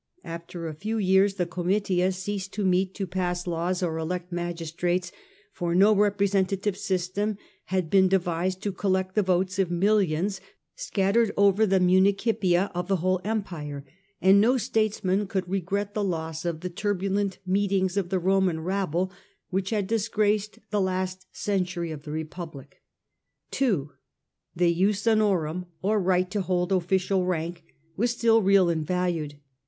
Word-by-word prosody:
After 170 Hz, 0 st, -7 dB
a 155 Hz, -, -5 dB
few 215 Hz, +9 st, -3 dB
years 195 Hz, 0 st, +3 dB
the 180 Hz, -2 st, 0 dB
j.jussuf -, -, -13 dB
Comitia 185 Hz, 0 st, +1 dB
ceased 195 Hz, +1 st, -4 dB
to 205 Hz, -1 st, -2 dB
meet 185 Hz, +1 st, +1 dB
to 195 Hz, -, -2 dB
pass 180 Hz, -1 st, -2 dB
laws 175 Hz, +2 st, -1 dB
or 160 Hz, -2 st, -1 dB
elect 180 Hz, +2 st, -4 dB
fragii. -, -, -3 dB
magistrates, 175 Hz, +1 st, -2 dB, 0.4 s
for 175 Hz, -1 st, -2 dB
no 200 Hz, +4 st, +6 dB
representative 200 Hz, -1 st, +1 dB
system 195 Hz, +3 st, -2 dB, 0.3 s
had 185 Hz, -4 st, -2 dB
been 190 Hz, -1 st, +5 dB
de 190 Hz, +1 st, +4 dB
vised 180 Hz, +2 st, -2 dB
to 205 Hz, -, -1 dB
collect 190 Hz, -1 st, -1 dB
the 210 Hz, -, +3 dB
votes 185 Hz, 0 st, 0 dB
of 190 Hz, -3 st, +2 dB
millions 190 Hz, 0 st, +1 dB, 0.3 s
scattered 225 Hz, -, +1 dB
over 200 Hz, +2 st, +4 dB
the 190 Hz, 0 st, +3 dB
municipia 190 Hz, 0 st, +3 dB
of 180 Hz, 0 st, -3 dB
the 195 Hz, -, +2 dB
whole 185 Hz, +1 st, 0 dB
Empire, 165 Hz, -10 st, -4 dB, 0.3 s
and 195 Hz, +2 st, +6 dB
no 245 Hz, +5 st, +4 dB
statesman 215 Hz, -4 st, 0 dB
could 190 Hz, -2 st, -2 dB
regret 195 Hz, +2 st, -2 dB
the 210 Hz, -, -1 dB
loss 160 Hz, -3 st, -3 dB
of 165 Hz, -2 st, -2 dB
the 180 Hz, -, -3 dB
turbulent 195 Hz, 0 st, -1 dB
meetings 190 Hz, -1 st, +1 dB
of 195 Hz, -3 st, -1 dB
the 190 Hz, -, +1 dB
Roman 185 Hz, -2 st, +2 dB
rabble 185 Hz, 0 st, -1 dB, 0.4 s
which 190 Hz, +1 st, -1 dB
had 210 Hz, -3 st, 0 dB
disgraced 210 Hz, 0 st, 0 dB
the 205 Hz, -1 st, +1 dB
last 185 Hz, 0 st, -2 dB
century 180 Hz, -4 st, -2 dB
of 150 Hz, 0 st, -8 dB
the 150 Hz, -, -6 dB
Re 160 Hz, +1 st, -2 dB
public. 155 Hz, -4 st, -10 dB, 0.7 s
2. 190 Hz, -, 0 dB, 0.6 s
The 170 Hz, 0 st, +3 dB
jus 195 Hz, +4 st, +1 dB
honorum^ 185 Hz, -6 st, +1 dB, 0.2 s
or 210 Hz, +1 st, +2 dB
right 185 Hz, 0 st, +1 dB
to 205 Hz, -1 st, 0 dB
hold 180 Hz, 0 st, -1 dB
official 190 Hz, +1 st, +1 dB
rank, 170 Hz, -1 st, -3 dB, 0.3 s
was 235 Hz, +7 st, +1 dB
still 230 Hz, -1 st, +3 dB
real 195 Hz, -2 st, +5 dB
and 165 Hz, -2 st, 0 dB
valued. 170 Hz, -3 st, -1 dB
185 Hz, 160 wpm, -26 LUFS, 175-200 Hz, 0.7 s, no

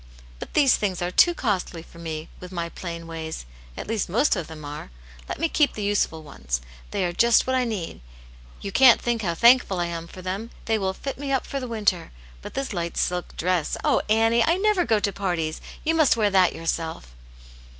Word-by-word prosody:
" -, -, -22 dB
But -, -, -9 dB
there 290 Hz, -2 st, +5 dB
things 205 Hz, -7 st, +2 dB
are 175 Hz, -, -1 dB
too 345 Hz, -, +5 dB
costly 185 Hz, -, -2 dB
for 170 Hz, -, -16 dB
me, 160 Hz, -1 st, -5 dB
with 180 Hz, 0 st, -10 dB
my 170 Hz, -2 st, -3 dB
plain 170 Hz, -1 st, -7 dB
ways; 160 Hz, -, -6 dB, 0.3 s
at -, -, -5 dB
least 220 Hz, -4 st, -2 dB
most 235 Hz, -, +3 dB
of 175 Hz, -5 st, -4 dB
them 155 Hz, -2 st, -9 dB
are. 145 Hz, -, -7 dB, 0.4 s
Let -, -, -3 dB
me 330 Hz, -, +2 dB
keep 300 Hz, -2 st, +2 dB
the 210 Hz, -, -5 dB
useful 200 Hz, -6 st, 0 dB
ones; 65 Hz, -, -4 dB, 0.3 s
they 195 Hz, -2 st, -1 dB
are 175 Hz, -, -2 dB
just 235 Hz, +5 st, +4 dB
what 260 Hz, -, 0 dB
I 255 Hz, -1 st, +2 dB
need. 195 Hz, -, -4 dB, 0.6 s
You 200 Hz, -, -5 dB
can't 255 Hz, +2 st, +7 dB
think 235 Hz, -2 st, -1 dB
how 170 Hz, -5 st, -1 dB
thankful 235 Hz, -2 st, +5 dB
I 175 Hz, -, +1 dB
am 170 Hz, -1 st, -5 dB
for 185 Hz, +2 st, -11 dB
them, 195 Hz, +5 st, -4 dB, 0.2 s
they 220 Hz, -1 st, +1 dB
will 190 Hz, -1 st, -1 dB
fit 275 Hz, -1 st, -5 dB
me 280 Hz, -1 st, -3 dB
up 270 Hz, -, +1 dB
for 275 Hz, -, -3 dB
the 255 Hz, -, -5 dB
winter. 205 Hz, -7 st, 0 dB, 0.3 s
But -, -, -9 dB
this 270 Hz, -4 st, -2 dB
light 170 Hz, -2 st, -3 dB
silk 180 Hz, 0 st, -2 dB
dress, 180 Hz, -2 st, 0 dB
oh, -, -, +3 dB
Annie 225 Hz, +2 st, +4 dB
I 330 Hz, -, +3 dB
I -, -, 0 dB
never 410 Hz, -2 st, +2 dB
go 220 Hz, -3 st, +3 dB
to 200 Hz, -1 st, -1 dB
parties; 170 Hz, -5 st, -2 dB, 0.2 s
you 325 Hz, -, +2 dB
must 315 Hz, -7 st, +4 dB
wear 210 Hz, -2 st, +2 dB
that 185 Hz, -2 st, +4 dB
yourself." 165 Hz, -, -3 dB
190 Hz, 220 wpm, -24 LUFS, 170-235 Hz, 0.6 s, can't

